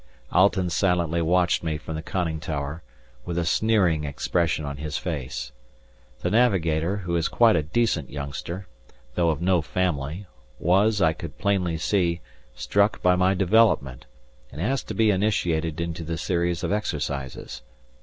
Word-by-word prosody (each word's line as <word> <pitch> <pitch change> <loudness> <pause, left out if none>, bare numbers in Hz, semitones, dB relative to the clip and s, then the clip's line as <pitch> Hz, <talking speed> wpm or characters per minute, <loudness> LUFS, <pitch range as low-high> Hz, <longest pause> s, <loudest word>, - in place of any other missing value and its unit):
Alten 95 -1 +3
silently 85 -1 +1
watched 90 +2 +2
me 80 -2 -1
from 80 - -7
the 80 - -4
conning 85 -3 -2
tower, 75 +1 -4 0.4
with 85 -1 -4
a 85 - 0
sneering 90 -4 +2
expression 80 +2 -1
on 70 -1 -5
his 75 +1 -4
face. 65 -7 -4 0.7
The - - -1
navigator, 95 -6 +2
who 90 -3 -3
is 85 -1 +1
quite 115 -2 +4
a 85 - +3
decent 80 - 0
youngster, 75 +6 -6 0.5
though 85 +3 +2
of 80 +1 -1
no 90 -2 +3
family, 80 +2 -2 0.3
was, 100 +4 +3
I 80 0 +4
could 85 -2 -9
plainly 95 -5 0
see, 85 0 +1 0.4
struck 100 +1 +1
by 90 0 +5
my 95 +1 +3
development, 90 - +2 0.4
and 70 - -9
asked 130 +10 -1
to - - -5
be 110 -2 +4
initiated 85 -6 0
into 85 -1 -3
the 80 +1 -3
series 85 -1 -1
of - - -1
exercises. 70 - -3
85 Hz, 155 wpm, -25 LUFS, 80-95 Hz, 0.7 s, by